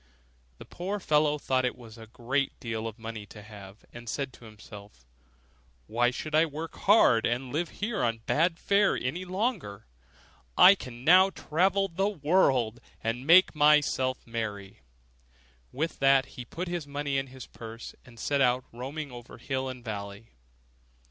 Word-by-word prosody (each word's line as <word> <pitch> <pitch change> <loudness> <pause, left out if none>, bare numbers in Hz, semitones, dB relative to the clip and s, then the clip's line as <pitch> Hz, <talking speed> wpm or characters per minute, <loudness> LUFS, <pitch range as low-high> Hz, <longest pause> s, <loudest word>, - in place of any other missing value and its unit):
The - - -11
poor 195 +4 -4
fellow 150 -3 +2
thought 130 -3 0
it 125 - -1
was 115 -2 -13
a 110 - -11
great 125 +4 -2
deal 115 -2 -4
of 110 0 -8
money 110 -2 -7
to 105 +1 -12
have, 100 -1 -13
and 120 -1 -9
said 135 -1 -3
to 120 - -15
himself, 105 - -13 0.8
'Why 120 +2 +1
should 155 +5 -6
I 155 +1 +5
work 155 +2 -7
hard, 195 - +4
and 125 +2 -3
live 165 +2 -1
here 215 +2 -3
on 115 -1 0
bad 165 +2 +1
fare 200 +2 +2
any 170 +9 -3
longer? 185 - -3 0.7
I 190 - +9
can 125 -10 -9
now 185 +5 +6
travel 190 +3 +1
into 170 -3 -10
the 195 +1 +2
wide 180 -9 -11
world, 130 -9 +2 0.2
and 120 +4 -3
make 180 +3 +7
myself 145 -4 +2
merry.' 105 -4 -5 0.9
With 155 +6 -3
that 135 -1 +4
he 125 - -8
put 175 +9 -6
his 170 -4 -4
money 145 -1 -2
into 135 -1 -7
his 130 -2 -9
purse, 115 0 -10
and 120 -4 -16
set 140 +3 0
out, 125 0 +2
roaming 140 +4 -6
over 120 0 -11
hill 130 +2 -3
and 125 -2 -9
valley. 100 0 -7
130 Hz, 170 wpm, -28 LUFS, 115-160 Hz, 0.9 s, I